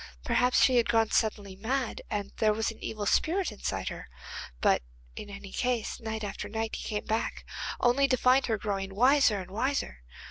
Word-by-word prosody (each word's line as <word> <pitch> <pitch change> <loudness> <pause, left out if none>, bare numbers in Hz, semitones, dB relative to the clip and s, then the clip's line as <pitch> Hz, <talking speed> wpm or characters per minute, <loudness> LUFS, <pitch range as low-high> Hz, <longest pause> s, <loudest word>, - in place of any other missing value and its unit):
Perhaps 250 0 +3
she 255 -2 +5
had 235 - +3
gone 225 -2 +3
suddenly 205 -3 0
mad, 240 +4 -2
and 205 -1 -3
there 215 -1 +3
was 220 +1 -1
an 225 - -14
evil 210 -2 -3
spirit 345 - +2
inside 210 - -3
her. - - -8 0.5
But - - +3 0.3
in 205 - -7
any 200 -1 -9
case, 245 -3 -1
night 220 -1 -4
after 205 0 -5
night 220 +1 -2
he - - -6
came 210 -2 -3
back, 220 +1 -2 0.3
only 260 +3 +4
to 255 -1 +2
find 255 +2 +4
her 225 -2 +1
growing 195 -2 -3
wiser 250 -2 +4
and 185 0 -8
wiser. 230 - -1
220 Hz, 185 wpm, -29 LUFS, 205-250 Hz, 0.5 s, she